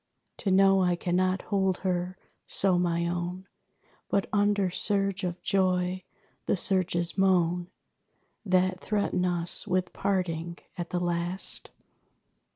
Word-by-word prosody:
To 205 - -2
know 195 0 +5
I 180 -1 +2
cannot 185 +1 0
hold 190 -2 +1
her 180 0 -1 0.3
so 185 -2 +2
my 170 -1 +1
own, 175 +2 -3 0.6
But 195 - +1
under 205 -2 +2
surge 195 +1 +1
of 180 -1 -3
joy, 185 -1 +1 0.4
the - - +3
surges 180 -2 0
moan 175 -2 +2 0.8
That 185 -2 +2
threaten 200 -4 0
us 175 -1 0
with 185 0 0
parting 175 -3 -1 0.2
at 175 -1 -5
the 180 - -1
last! 175 +1 -2
185 Hz, 120 wpm, -28 LUFS, 175-190 Hz, 0.8 s, know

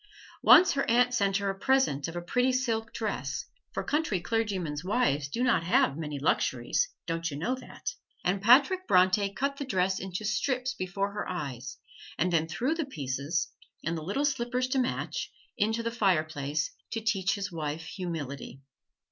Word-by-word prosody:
Once 365 - +8
her 275 - 0
aunt 245 +2 +4
sent 200 -5 +2
her 200 -1 0
a - - -7
present 195 - +2
of 165 - -7
a 175 - -2
pretty 250 +8 +2
silk 230 -3 -1
dress, 220 -2 -3 0.3
for - - -3
country 300 - 0
clergymen's 185 -7 -1
wives 150 - +1
do 230 - -2
not 245 -9 +3
have 230 - +3
many 150 -2 -4
luxuries 165 - +1 0.2
don't 165 0 -2
you 140 - -5
know 205 - 0
that? 260 - -6 0.3
and 190 +2 +1
Patrick 285 - +5
Bronte 185 +2 +4
cut 275 +7 -2
the 280 - -3
dress 190 -7 +1
into 190 +2 -5
strips 250 +4 0
before 195 +2 -2
her 205 -1 -4
eyes 135 -9 -5 0.4
and 180 +2 +1
then 160 -1 +2
threw 255 - 0
the 325 -2 -2
pieces, 140 - -2 0.4
and 170 - 0
the 160 - -4
little 200 - -1
slippers 255 -2 0
to 265 - +1
match, 255 - -2 0.2
into 220 +3 0
the 230 - -1
fireplace, 155 -8 0 0.2
to 225 - -1
teach 215 -4 +1
his 200 -1 -4
wife 160 -1 -4
humility. 150 -6 -6
195 Hz, 175 wpm, -29 LUFS, 165-245 Hz, 0.4 s, Once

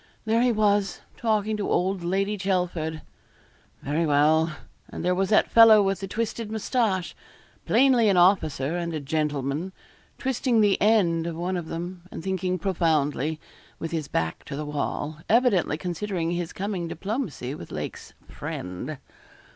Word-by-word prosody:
There 225 +1 +2
he 250 0 +4
was, 205 -2 +1 0.2
talking 215 -2 0
to 205 - -2
old 185 0 0
Lady 195 +4 0
Chelford. 180 -5 -2 0.8
Very 150 +4 0
well; 155 +2 +3 0.4
and - - -6
there 180 - +3
was 190 +1 0
that 215 - +3
fellow 225 -2 +8
with 195 -1 0
the 195 - -5
twisted 225 +1 -3
moustache 220 -4 0 0.5
plainly 250 -5 +4
an 190 - +3
officer 170 -5 +3
and 170 -2 -3
a - - -2
gentleman 150 +2 -2 0.5
twisting 255 -2 +1
the 205 -2 +3
end 175 -6 +3
of 170 - -4
one 180 +3 -2
of 175 -3 -4
them, 175 +2 -5
and 160 - -8
thinking 185 -1 -1
profoundly, 160 -5 0 0.4
with 165 - -5
his 160 -4 -2
back 80 0 -2
to 140 - -6
the 150 +1 -4
wall, 150 +1 -3
evidently 215 - +3
considering 175 0 -3
his 175 -1 -3
coming 190 -3 -3
diplomacy 180 - -4
with 85 - -9
Lake's - - -6
'friend.' 90 +12 -6
180 Hz, 150 wpm, -25 LUFS, 160-205 Hz, 0.8 s, fellow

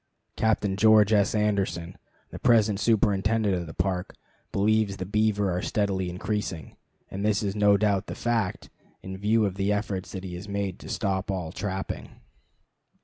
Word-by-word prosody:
Captain 105 -3 +1
George 110 0 +5
S. 100 0 +3
Anderson, 100 -5 -1 0.4
the - - -8
present 110 -4 +3
superintendent 105 -1 +2
of 85 -2 -2
the 80 - -8
Park, 90 0 -2 0.4
believes 105 0 +1
the 95 - -4
beaver 105 -2 +1
are 90 - -1
steadily 95 -3 -1
increasing, 90 -4 -4 0.4
and 100 +1 -4
this 105 +1 +1
is 100 -1 -2
no 105 -1 +4
doubt 100 -2 +1
the - - -5
fact, 115 -5 -2 0.3
in 95 0 -6
view 105 +3 +2
of 95 -1 -3
the 100 +1 +1
efforts 100 -2 -2
that 95 -1 -5
he 90 -2 -6
has 90 +4 -7
made 100 -2 -3
to - - -10
stop 95 -2 -2
all 90 -5 -3
trapping. 95 0 -4
100 Hz, 165 wpm, -26 LUFS, 95-105 Hz, 0.4 s, George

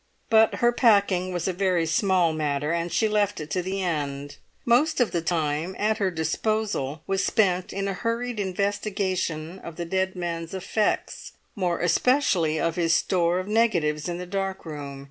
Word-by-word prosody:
But 220 0 +5
her 240 0 +3
packing 200 -6 +3
was 175 -1 -2
a 190 - 0
very 180 -2 +1
small 175 0 +2
matter, 150 -1 -1
and 170 0 -1
she 220 - +2
left 205 -2 +1
it 150 -1 -7
to 180 - 0
the 190 +2 -3
end; 145 -4 -3 0.3
most 280 +7 +3
of 245 - +2
the 170 - -1
time 165 +1 -1
at 215 +1 0
her 195 -2 +2
disposal 160 -2 -2
was 195 0 0
spent 185 -4 +1
in 195 0 -2
a 195 - -1
hurried 230 +3 -2
investigation 190 -3 -2
of 170 -3 -9
the 170 - -4
dead 190 +2 -1
man's 170 -1 -4
effects, 210 +3 -2 0.2
more 180 -4 0
especially 175 - +2
of 165 0 -1
his 165 -2 +3
store 175 -1 +1
of 185 +1 -3
negatives 180 -9 +1
in 175 - -3
the 180 - -6
dark 195 0 -3
room. 145 -3 -7
185 Hz, 175 wpm, -25 LUFS, 165-205 Hz, 0.3 s, But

